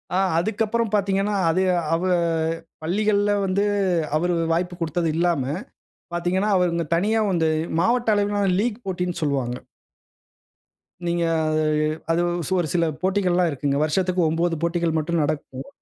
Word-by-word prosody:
ஆ - - +3 0.2
அதுக்கப்புறம் 220 +3 -1
பாத்தீங்கன்னா, 200 0 +1 0.2
அது 185 +3 +2 0.3
அவு 175 +3 0 0.7
பள்ளிகள்ல 205 +4 +1
வந்து, 195 +1 +1 0.5
அவரு 175 +2 0 0.2
வாய்ப்பு 175 +1 -1
குடுத்தது 165 +1 0
இல்லாம 170 -5 +1 0.7
பாத்தீங்கன்னா, 180 +4 0
அவர் 180 -1 +2
இந்த 170 -2 -1
தனியா 210 +6 +1
வந்து 165 -3 +2 0.3
மாவட்ட 235 +2 +2
அளவிலான 205 -1 +1
லீக் 235 0 -2
போட்டின்னு 180 -2 -3
சொல்லுவாங்க. 135 -5 -1 1.5
நீங்க 170 0 0 0.3
அது 155 - +1 0.5
அது 170 - +2 0.4
ஒரு 170 - 0
சில 170 -1 +2 0.2
போட்டிகள்லாம் 180 -2 +2
இருக்குங்க. 140 0 -1
வருஷத்துக்கு 180 +4 +1
9 165 +1 0
போட்டிகள் 170 -1 0
மட்டும் 165 +1 0
நடக்கும். 145 - -4
175 Hz, 125 wpm, -23 LUFS, 165-200 Hz, 1.5 s, ஆ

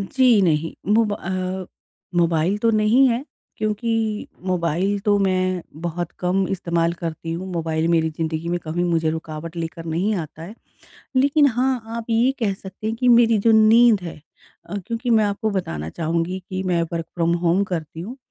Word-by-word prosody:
जी, 240 +2 +3
नहीं 160 -2 +1 0.2
मोब 220 -2 +3
अ, 185 0 -3 0.5
मोबाइल 170 +2 +2
तो 230 +1 +2
नहीं 225 +5 +4
है 240 +4 -1 0.3
क्योंकि 220 0 -1 0.2
मोबाइल 180 +3 0
तो 205 -1 +3
मैं 185 -2 +1 0.2
बहुत 175 0 -3
कम 185 +1 +1
इस्तेमाल 170 -3 0
करती 165 -1 -5
हूँ। 180 +3 -4
मोबाइल 160 -1 -1
मेरी 165 -1 +2
ज़िंदगी 160 +1 -3
में 175 0 0
कभी 170 +3 -1
मुझे 165 -2 +1
रुकावट 160 +1 -6
लेकर 165 0 -5
नहीं 175 +7 0
आता 160 -2 -6
है। 185 +6 -9 0.6
लेकिन 285 +3 +4
हाँ, 255 0 0 0.2
आप 230 - -5
ये 235 +4 +3
कह 205 -4 +1
सकते 190 +2 -8
हैं 225 - -1
कि 250 +2 0
मेरी 230 -2 +6
जो - - +7
नींद 220 0 +6
है 165 -4 -8 0.5
अ, 205 - -3
क्योंकि 235 +1 -3
मैं 220 -2 +5
आपको 205 +2 -1
बताना 80 - -3
चाहूँगी 170 - -2
कि 185 0 -3
मैं 175 -2 +1
वर्क़ 165 -1 -2
फ्रॉम 170 0 +1
होम 175 +4 +3
करती 165 -4 -5
हूँ 235 +9 -7
185 Hz, 175 wpm, -22 LUFS, 165-220 Hz, 0.6 s, जो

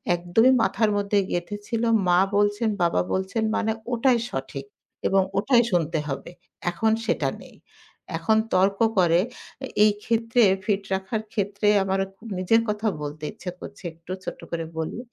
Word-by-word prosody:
একদমই 175 +9 +3
মাথার 210 +3 +2
মধ্যে 205 0 +1
গেঁথে 175 +4 -2
ছিল 230 -1 -1 0.3
মা 175 0 +5 0.2
বলছেন, 205 +2 +2
বাবা 170 - +2
বলছেন 190 +4 -1
মানে 220 0 +1 0.2
ওটাই 240 +1 +3
সঠিক 135 +1 -5 0.4
এবং 195 0 +4 0.2
ওটাই 240 +3 +4
শুনতে 165 -2 +1
হবে। 135 +2 -5 0.4
এখন 220 +5 +1
সেটা - - +1
নেই। - - -14 0.6
এখন 220 -1 +2 0.2
তর্ক 195 +2 +3 0.2
করে। 170 -1 +4 0.5
এ - - -6 0.2
এই 215 - +6
ক্ষেত্রে, 230 +1 +2 0.2
ফিট 200 -2 0
রাখার 190 +3 -2
ক্ষেত্রে 205 0 -1 0.2
আমার 190 0 0 0.2
ক - - -45 0.2
নিজের 205 +5 +3
কথা 210 +1 -1
বলতে 150 +1 -6
ইচ্ছা 180 - -6
করছে। 205 0 -10
একটু 165 +2 -12
ছোট্ট - - -6
করে 165 -1 -2
বলি। 160 +7 -3
195 Hz, 155 wpm, -24 LUFS, 175-220 Hz, 0.6 s, এই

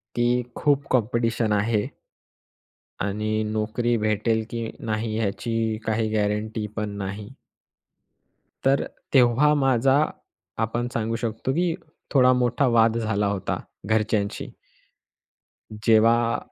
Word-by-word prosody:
की 120 +1 +2
खूप 140 -1 +1
कॉम्पिटिशन 115 -2 +1
आहे. 105 0 +1 1.1
आणि 110 +2 -1
नोकरी 110 +2 0
भेटेल 110 +1 0
की 115 -1 -4
नाही 110 0 -2
याची 115 +1 -1
काही 110 0 0
गॅरंटीपण 105 0 -2
नाही. 100 +2 -5 1.3
तर 135 +1 +3 0.3
तेव्हा 135 +3 +5
माझा 135 +1 +3 0.6
आपण 115 +2 -1
सांगू 115 0 -1
शकतो 115 +2 -2
की 175 +1 +1 0.4
थोडा 130 -2 +6
मोठा 125 +2 +1
वाद 115 0 +4
झाला 105 -3 0
होता 100 -2 -2 0.3
घरच्यांशी. 110 -2 0 1.4
जेव्हा 115 +1 +4
115 Hz, 100 wpm, -24 LUFS, 110-120 Hz, 1.4 s, थोडा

